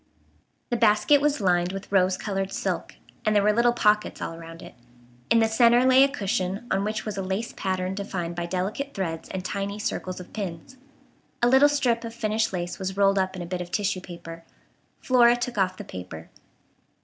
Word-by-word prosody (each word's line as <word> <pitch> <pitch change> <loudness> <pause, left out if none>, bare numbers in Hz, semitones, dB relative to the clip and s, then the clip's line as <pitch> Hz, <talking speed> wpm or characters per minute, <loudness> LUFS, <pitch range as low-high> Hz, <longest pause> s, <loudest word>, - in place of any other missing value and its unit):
The 240 - +1
basket 220 +5 +4
was 295 0 +1
lined 180 -3 +2
with 195 0 -7
rose 185 -1 +3
colored 195 -2 -3
silk, - - -3 0.3
and 215 0 +1
there 205 - +4
were 210 +1 +4
little 235 +2 +4
pockets 210 -2 +1
all - - -4
around 165 0 -10
it. - - -11 0.6
In 230 - +5
the 225 -1 +4
centre 235 +2 +4
lay 260 +1 +7
a - - +5
cushion 195 -5 -2
on 195 +1 +1
which 215 +1 -3
was 210 -2 -4
a - - -1
lace 190 +4 -3
pattern 185 -1 -2
defined 185 -4 -4
by 170 0 -3
delicate 200 +11 -3
threads 165 -5 -4
and 185 -1 -5
tiny 200 +1 -3
circles 185 -3 -4
of 180 - -12
pins. 195 +4 -6 0.7
A - - +6
little 265 +3 +6
strip 250 -5 +1
of 230 0 -7
finished 220 -1 0
lace 175 0 -4
was 190 0 -4
rolled 195 0 +4
up 190 0 -1
in 180 - -5
a - - -6
bit 180 +1 -4
of 175 - -6
tissue 200 -1 -1
paper. 165 -2 -10 0.6
Flora 240 -2 +5
took 240 -2 -3
off 185 -1 +1
the - - -7
paper. 90 -3 -9
195 Hz, 200 wpm, -25 LUFS, 185-230 Hz, 0.7 s, lay